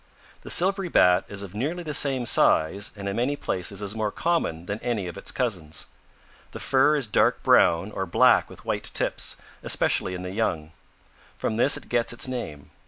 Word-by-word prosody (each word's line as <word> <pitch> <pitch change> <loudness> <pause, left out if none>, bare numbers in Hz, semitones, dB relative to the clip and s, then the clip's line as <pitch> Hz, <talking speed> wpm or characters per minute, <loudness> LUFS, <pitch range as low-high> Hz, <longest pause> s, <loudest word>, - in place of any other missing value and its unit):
"The - - -11
Silvery 190 +1 +3
Bat 90 - +4
is 100 -1 -5
of 100 -2 -10
nearly 155 +11 -3
the 150 -2 -5
same 135 -4 +2
size 100 -2 +2
and 100 -1 -7
in 100 - -3
many 125 +5 0
places 95 -4 -2
is 100 0 -4
more 110 -1 -2
common 130 - -1
than 100 +3 -4
any 120 -5 -2
its 85 -2 -4
cousins. 90 - -3 0.7
The - - -7
fur 135 +3 +3
is 140 -4 0
dark 105 - +1
brown 85 +5 +3
or 95 -2 -4
black 85 - +4
with - - -14
white - - -3
tips, - - 0 0.2
especially 90 - +1
in 90 - -7
the 90 - -5
young. 85 -7 -2 0.7
From 110 - -2
this 135 +4 +4
it - - -12
gets 120 -1 0
its 120 - -1
name. 120 - -6
105 Hz, 185 wpm, -25 LUFS, 90-130 Hz, 0.7 s, Bat